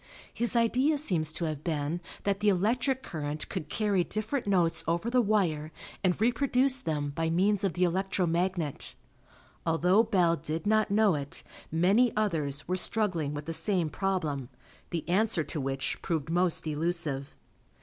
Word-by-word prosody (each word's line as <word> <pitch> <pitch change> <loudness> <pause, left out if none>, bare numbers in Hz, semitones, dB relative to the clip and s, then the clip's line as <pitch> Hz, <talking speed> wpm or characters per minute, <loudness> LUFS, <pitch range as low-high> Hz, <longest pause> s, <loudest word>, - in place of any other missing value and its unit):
His 240 +1 +1
idea 255 +6 +3
seems 170 - 0
to 170 - -2
have 155 -2 -4
been 160 +1 -2 0.2
that 200 -1 0
the 210 0 +3
electric 240 +8 +1
current 150 -1 -4
could 155 -6 -5
carry 205 -4 +1
different 215 +6 -3
notes 175 -4 +2
over 170 +8 0
the 250 0 +4
wire 175 -8 0 0.3
and 185 -1 +2
reproduce 255 +3 +3
them 150 -5 -2
by 165 +3 -1
means 195 +4 +2
of 195 -4 +1
the 180 - 0
electro 185 +1 +1
magnet. 170 -3 -2 0.7
Although 180 +5 +3
Bell 180 -7 +2
did 160 +4 -4
not 215 +1 +2
know 205 -1 +4
it, 145 -2 -4 0.3
many 195 +9 +3
others 155 -9 0
were 185 +1 0
struggling 175 -9 0
with 145 0 -6
the 165 - -3
same 165 -1 +1
problem, 155 -10 -2 0.4
the 170 -3 -4
answer 195 -1 +2
to 150 +1 -4
which 135 0 -3
proved 160 -2 -2
most 175 -1 +1
elusive. 155 -3 -2
175 Hz, 160 wpm, -29 LUFS, 155-210 Hz, 0.7 s, the